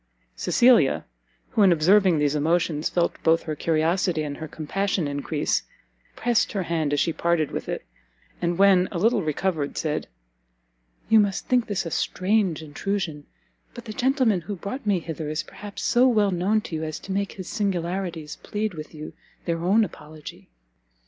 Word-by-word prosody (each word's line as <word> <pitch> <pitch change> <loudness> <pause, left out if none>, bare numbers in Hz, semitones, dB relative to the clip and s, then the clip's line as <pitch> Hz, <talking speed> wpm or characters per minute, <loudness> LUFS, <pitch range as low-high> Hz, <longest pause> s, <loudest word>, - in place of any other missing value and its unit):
Cecilia, 240 - +4 0.5
who 220 - +1
in 195 -2 +7
observing 180 +2 +4
these 145 -1 +2
emotions 155 0 +1
felt 175 -1 0
both 165 +1 +3
her 155 - -4
curiosity 165 +2 +1
and 145 -1 -5
her 160 - -6
compassion 170 +3 -2
encrease, 145 +1 -1 0.5
pressed 240 0 +1
her 195 -3 -1
hand 160 -4 -1
as 145 - +1
she 165 - +1
parted 170 -3 0
with - - -5
it, - - -4 0.6
and, 170 0 0
when 190 -2 +5
a 180 - -3
little 225 +4 +3
recovered, 155 -1 -2
said, 155 -1 -2 1.0
"You 220 - +6
must 200 -2 +1
think 250 -2 +2
this 195 -3 -2
a 165 - -4
strange 185 -3 0
intrusion; 155 -1 -3 0.5
but - - -9
the 215 - -6
gentleman 250 -5 +2
who 200 +5 -5
brought 210 +6 -6
me 195 -4 +2
hither 160 -2 -5
is 155 +1 -2
perhaps 205 -1 -9
so 245 +2 +4
well 210 -5 +3
known 190 +5 +1
to 170 - -6
you, 160 - -3
as 155 -1 -4
to 195 - -7
make 200 +1 -1
his 185 -2 -8
singularities 180 -5 -2
plead 210 -1 -3
with 155 0 -9
you 155 0 -8 0.3
their 165 0 -2
own 205 +5 +4
apology." 155 -5 -9
175 Hz, 170 wpm, -25 LUFS, 155-205 Hz, 1.0 s, in